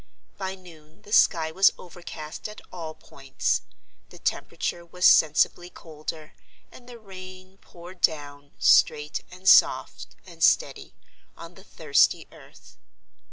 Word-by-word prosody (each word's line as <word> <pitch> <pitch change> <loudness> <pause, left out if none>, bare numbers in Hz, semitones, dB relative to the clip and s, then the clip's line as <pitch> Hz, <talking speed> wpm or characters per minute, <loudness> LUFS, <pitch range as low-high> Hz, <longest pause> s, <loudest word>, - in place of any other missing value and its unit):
By 190 -1 -5
noon 170 0 -18
the 210 - -9
sky 160 -1 +3
was 190 +4 +5
overcast 170 -1 -9
at 210 - -11
all 160 -3 -8
points; 135 -1 -3 0.5
the - - -15
temperature 170 - -4
was 180 +1 -3
sensibly 160 +3 +4
colder; 155 -2 -9 0.4
and 245 0 -16
the 240 - -11
rain 185 -2 -13
poured 175 +1 -15
down, 145 -2 -1
straight 150 0 +2
and 185 +1 -12
soft - - +3
and - - -8
steady, - - +1 0.4
on 170 +1 -11
the 190 - -17
thirsty 155 -7 +1
earth. - - -18
175 Hz, 125 wpm, -25 LUFS, 155-185 Hz, 0.5 s, was